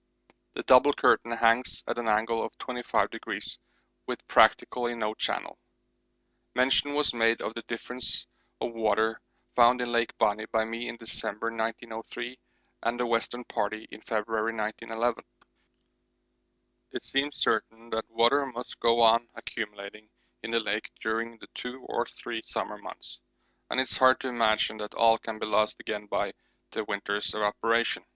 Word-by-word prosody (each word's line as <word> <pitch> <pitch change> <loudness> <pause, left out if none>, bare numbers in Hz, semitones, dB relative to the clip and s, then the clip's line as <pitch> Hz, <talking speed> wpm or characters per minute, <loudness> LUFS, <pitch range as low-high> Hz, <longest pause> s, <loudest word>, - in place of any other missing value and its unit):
The - - -5
'double 135 +3 +7
curtain' 115 - +3
hangs 115 +2 +3
at - - -2
an 120 - -3
angle 110 +1 +2
of - - -4
25°, 125 -1 -2 0.5
with - - -5
practically 120 -1 +4
no 110 -2 -1
channel. - - -2 1.0
Mention 135 +3 +3
was 150 -3 +2
made 115 -1 +3
of - - -4
the 115 - -5
difference 125 +2 -2 0.3
of 120 - -3
water 110 0 +1 0.3
found 120 +1 +6
in 120 -1 -2
Lake 115 -1 0
Bonney 105 +1 +1
by 110 0 +1
me 115 +2 -4
in 115 - -5
December 115 -1 -2
1903 115 +2 -5 0.4
and 120 +1 -1
the 125 - +1
Western 120 +1 0
Party 110 -1 -3
in 110 - -10
February 110 +1 -1
1911. 115 +2 -2 1.7
It - - -6
seems 140 +2 0
certain 115 +1 0
that 110 0 -2
water 120 +5 +4
must 125 -1 -7
go 115 0 +4
on 115 +1 +5
accumulating 105 0 -6 0.3
in 110 - -6
the 115 0 +2
lake 105 0 -2
during 115 +1 -2
the - - -13
two 125 +1 -7
or 120 - -1
three 115 -2 -6
summer - - -3
months, - - -9 0.5
and - - +1
it - - +5
is 130 - -1
hard 130 0 +6
to 130 - -2
imagine 110 -2 +2
that 105 0 -7
all 115 -1 +5
can 110 -1 -6
be - - -3
lost 110 0 +1
again 105 -1 -5
by - - -1 0.4
the - - -2
winter's 100 +1 -1
evaporation. 115 +2 +1
115 Hz, 155 wpm, -28 LUFS, 110-120 Hz, 1.7 s, double